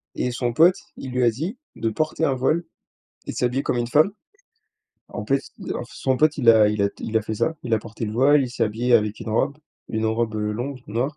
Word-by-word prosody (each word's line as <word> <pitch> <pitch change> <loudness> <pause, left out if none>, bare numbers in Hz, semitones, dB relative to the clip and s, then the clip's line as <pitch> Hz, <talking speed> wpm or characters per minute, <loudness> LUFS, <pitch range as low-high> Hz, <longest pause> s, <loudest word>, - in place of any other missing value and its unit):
et 125 - -1
son 120 -1 -2
pote, 170 +8 +6 0.2
il 130 - -7
lui 125 0 0
a - - +6
dit 165 - -4 0.2
de 115 - -1
porter 155 +7 -2
un 135 - +2
voile 155 +7 +1 0.6
et - - -2
de - - -10
s'habiller 125 +2 0
comme - - 0
une 120 -1 -1
femme. 155 +9 +4 1.0
En - - -6
fait - - +2 0.3
et - - -5
alors - - -3
son 130 -1 -1
pote, 155 0 +3
il 120 -4 +6
a 110 -2 +6
il 105 -1 0
a 100 - +3
il 110 - -2
a 110 - +2
fait 110 - -4
ça, 160 +7 0
il 120 - -5
a - - +2
porté 115 +1 -7
le 105 - -4
voile, 140 +4 +4
il 125 - -3
s'est 125 - 0
habillé, 115 +3 -1
heu, - - +9
avec 105 0 -4
une 110 - -5
robe, 125 +6 +1 0.3
une 110 0 -2
robe, 110 0 0
heu, 105 0 -1
longue, 130 +4 -4
noire. 125 +8 -2
120 Hz, 260 wpm, -23 LUFS, 110-140 Hz, 1.0 s, heu